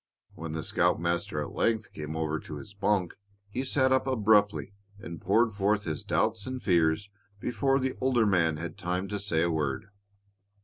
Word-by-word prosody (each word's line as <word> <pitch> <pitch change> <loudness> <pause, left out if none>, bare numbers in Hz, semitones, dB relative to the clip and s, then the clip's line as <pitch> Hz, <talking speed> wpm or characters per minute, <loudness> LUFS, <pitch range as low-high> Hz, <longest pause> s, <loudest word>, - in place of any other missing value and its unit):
When 80 -1 -6
the 80 -1 -3
scoutmaster 85 -3 0
at - - -7
length 110 -1 0
came 75 0 -5
over 80 -1 -1
to 75 - -8
his 75 +8 -9
bunk 100 -2 0 0.4
he 130 +5 -2
sat 130 0 +2
up 130 0 +2
abruptly 105 -5 +3 0.2
and 85 -5 -8
poured 115 +5 +3
forth 100 +1 +1
his 80 -4 -3
doubts 110 -1 0
and 130 0 -3
fears 85 0 +2 0.3
before 135 +5 +1
the 130 0 -1
older 125 -3 +3
man 85 -6 +2
had 85 +2 -6
time 90 +2 -2
to 105 0 -2
say 85 -5 0
a 85 - +1
word. 75 +2 -2
100 Hz, 175 wpm, -29 LUFS, 80-110 Hz, 0.4 s, abruptly